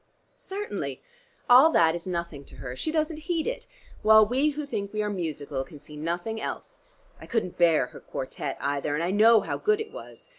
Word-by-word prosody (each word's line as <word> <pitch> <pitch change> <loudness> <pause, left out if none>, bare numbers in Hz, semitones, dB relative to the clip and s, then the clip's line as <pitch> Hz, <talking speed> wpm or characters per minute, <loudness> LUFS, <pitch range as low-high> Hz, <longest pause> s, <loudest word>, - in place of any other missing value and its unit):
"Certainly: 410 +3 -5 0.5
all 255 +6 +8
that 160 -1 +5
is 170 +1 -6
nothing 170 -5 -4
to - - -14
her. 125 -1 -7
She 315 - -3
doesn't 310 0 0
heed 330 -3 0
it, - - -4 0.3
while 220 0 +7
we 260 +7 +1
who 300 0 -4
think 200 -8 -4
we 215 0 -1
are 210 - -2
musical 150 -7 -3
can 150 - -13
see 150 +1 -13
nothing 175 +8 -3
else. - - -6 0.4
I - - -11
couldn't 220 -8 -2
bear 165 -5 +4
her - - -10
quartette 135 +1 -5
either, 145 +1 -1
and 160 - -1
I 175 - 0
know 220 +2 +6
how - - -4
good 425 0 +2
it 440 - -5
was. - - -12
200 Hz, 200 wpm, -27 LUFS, -, 0.5 s, all